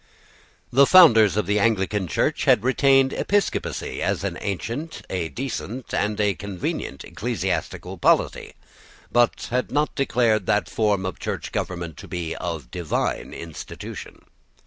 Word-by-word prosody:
The 140 +2 +6
founders 115 - +7
of 105 - +1
the 105 +3 +1
Anglican 100 -3 +1
Church - - 0
had 105 - +4
retained 135 0 +4
episcopacy 205 0 -1
as - - -1
an - - -2
ancient, 115 - -4
a 85 -3 -2
decent, 125 - -5
and 105 0 0
a 105 -1 +2
convenient 95 -2 -5
ecclesiastical - - -3
polity, - - +2 0.6
but 120 -1 +2
had 125 +1 0
not 150 +1 +1
declared 115 -7 +1
that 105 - +2
form 105 -4 0
of 95 - -4
church - - -4
government 85 -3 -4
to - - -10
be 85 -2 -4
of 80 -8 -5
divine 85 -3 -2
institution. 85 -2 -9
105 Hz, 135 wpm, -23 LUFS, 90-125 Hz, 0.6 s, founders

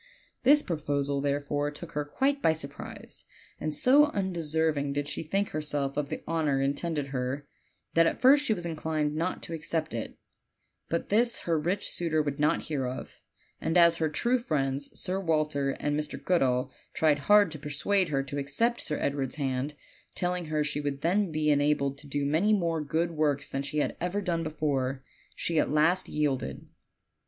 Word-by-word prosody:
This 290 +4 +5
proposal, 145 -4 -1
therefore, 145 +1 0
took 160 +3 -9
her 150 -1 -1
quite 275 - 0
by 160 - +4
surprise, 140 -3 -9 0.3
and 155 - -2
so 265 - +6
undeserving 160 - -1
did 145 0 -2
she - - -3
think 195 +6 -1
herself 145 -2 -2
of 145 -1 -2
the - - -5
honor 155 -4 +1
intended 140 +1 -1
her 135 +2 -3 0.5
that 165 0 +5
at - - -1
first 280 +3 +6
she 255 - 0
was 175 -2 -6
inclined 155 -2 -1
not 165 +4 -2
to 165 - -6
accept 160 -1 -2
it, 115 -2 -5 0.7
but 170 - -2
this 235 +3 +3
her 165 -2 0
rich 180 +6 -1
suitor 165 -2 0
would 145 -1 -3
not 150 +1 +2
hear 140 -5 -2
of; 125 - -7 0.4
and 165 +2 +1
as 170 -1 +6
her 160 -1 +1
true 240 +11 +1
friends, 140 - -1
Sir 185 +1 -1
Walter 155 -5 0
and 145 0 0
Mr. 150 - -3
Goodall, 130 -7 +1 0.2
tried 150 -2 +3
hard 205 -4 +7
to 155 - -7
persuade 165 +7 0
her 135 -2 0
to 140 +1 -4
accept 230 - 0
Sir 150 - -1
Edward's 140 -2 -1
hand, 140 0 -2 0.4
telling 180 -1 -1
her 155 -1 0
she 145 0 -2
would 140 -1 -3
then 185 +3 +1
be 155 -1 +1
enabled 145 -1 +1
to 145 - -11
do 140 0 -1
many 165 +9 +3
more 165 -5 +1
good 165 +4 0
works 150 -3 0
than 135 - -1
she 140 +2 -4
had 150 - 0
ever 180 +4 -1
done 175 -4 -1
before, 140 -4 -1 0.3
she 165 -2 0
at - - +1
last 160 +5 +2
yielded. 145 -4 -2
155 Hz, 180 wpm, -29 LUFS, 145-170 Hz, 0.7 s, hard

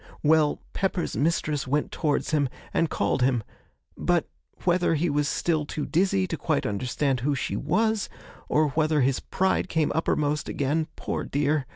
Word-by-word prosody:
Well, 155 -1 +4
Pepper's 190 -3 -1
mistress 150 -2 0
went 145 +3 0
towards 150 0 0
him, 145 -4 +2 0.2
and 165 - +2
called - - 0
him; 125 -3 +2 0.5
but - - +1 0.4
whether 175 -2 +2
he 160 +1 +1
was 145 0 +1
still 155 0 0
too 150 0 -4
dizzy 165 - +2
to - - -4
quite - - 0
understand 125 +5 0
who 140 +4 0
she 130 - -2
was, 215 +7 +1 0.4
or 155 0 +3
whether 155 0 +2
his 130 0 +2
pride 190 0 0
came 160 -2 +1
uppermost 150 -2 0
again, 150 +3 0
poor - - -3
dear! 145 -1 0
150 Hz, 160 wpm, -26 LUFS, 140-165 Hz, 0.5 s, Well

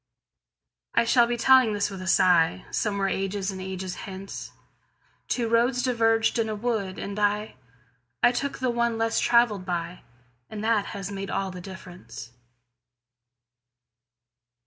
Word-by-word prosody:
I - - +4
shall 235 0 +4
be 240 0 -1
telling 255 -2 +5
this 205 0 -1
with 190 -1 -7
a - - -6
sighSomewhere 185 - +2
ages 195 0 -2
and 190 -1 -7
ages 190 -1 -5 0.2
hence:Two 195 +4 -7
roads 240 +2 +2
diverged 225 -2 +2
in 220 -1 0
a 215 - -2
wood, 210 -4 -2
and 200 +1 -5
I—I 125 - -2
took 280 +3 -3
the 255 -2 0
one 235 -1 0
less 225 0 +1
traveled 235 -5 +3
by, 175 -1 -4 0.5
And 215 -1 -6
that 220 -2 +2
has 195 0 -5
made 195 0 -5
all 195 -1 -2
the 180 0 -8
difference. 175 - -10
200 Hz, 130 wpm, -26 LUFS, 185-230 Hz, 0.5 s, telling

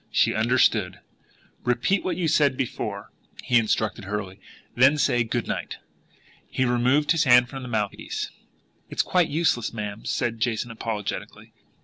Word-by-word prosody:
She - - +2
understood! 110 -5 +2 0.6
"Repeat 125 +11 +1
what 185 - -2
you 175 -3 0
said 145 -4 +3
before, 130 - -4 0.2
Jason," - - -13
he 120 -1 +4
instructed 110 -1 -1
hurriedly. 95 -1 -5 0.3
"Then 130 +4 +5
say 120 -4 +2
'Good 110 - -3
night.'" - - -4 0.7
He 130 - 0
removed 125 +5 +2
his 165 -2 +3
hand 125 -1 +6
from 135 +1 -7
the 125 - -7
mouthpiece. 105 -3 -3 0.6
"It's - - 0
quite 180 -2 +2
useless, 145 -8 0
ma'am," 105 -1 -5
said 115 -2 -1
Jason 120 0 -1
apologetically. 110 -2 -5
120 Hz, 145 wpm, -25 LUFS, 110-135 Hz, 0.7 s, hand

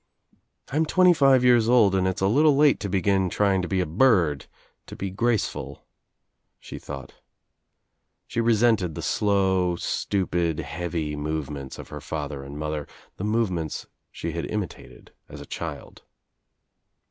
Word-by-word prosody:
"I'm 155 +4 0
twenty 180 +1 +5
five 135 -5 +4
years 120 -2 +4
old 115 -6 +5
and 95 -1 +2
it's 95 - -2
a 95 - +3
little 145 +7 +4
late 145 -1 +4
to 100 - -4
begin 95 0 +1
trying 100 0 +1
to 90 - -3
be 95 0 0
a - - 0
bird, 85 - +2 0.4
to - - -9
be 95 -1 -4
graceful," 115 +2 -2 0.7
she - - -9
thought. 70 -1 -8 1.1
She 115 - -2
resented 110 -7 +2
the - - -5
slow 95 -3 +1
stupid 85 -3 -1
heavy 85 -3 -3
movements 75 -2 -4
of - - -10
her - - -8
father 75 -3 -5
and 70 +1 -9
mother, 75 -1 -4 0.3
the - - -5
movements 100 -8 -1 0.3
she 85 - -5
had 85 +1 -4
Imitated 105 -4 -6 0.2
as - - -10
a - - -9
child. 80 -4 -7
95 Hz, 145 wpm, -25 LUFS, 80-115 Hz, 1.1 s, twenty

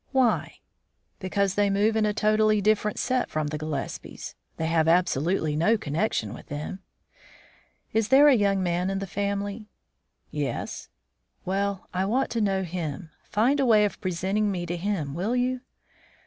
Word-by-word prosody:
"Why?" 255 -4 +2 0.6
"Because 195 0 0
they 205 0 +2
move 205 +3 +2
in 215 -1 +2
a - - +2
totally 215 0 +3
different 210 +1 +1
set 255 -1 0
from 155 -1 -2
the 150 - -3
Gillespies. 155 -3 -5 0.2
They 160 - -2
have 160 -1 +2
absolutely 165 -2 +2
no 175 +9 +3
connection 150 - -1
with - - -11
them." 150 +6 -5 1.1
"Is 220 -1 +2
there 270 +5 +7
a 290 - +7
young 200 -4 +2
man 175 +1 0
in 195 - -1
the 195 - -3
family?" 200 +2 -3 0.6
"Yes." - - -4 0.6
"Well, 195 +1 -1
I 185 +1 0
want 255 +7 0
to 230 - 0
know 195 -2 +1
him. 165 -2 -5
Find 250 +7 +2
a 270 - +3
way 215 -2 +6
of 205 - -4
presenting 190 +3 0
me 180 -3 -2
to 175 +1 -3
him, 175 -6 -2
will 195 +10 -1
you?" 250 0 0
200 Hz, 160 wpm, -26 LUFS, 175-215 Hz, 1.1 s, there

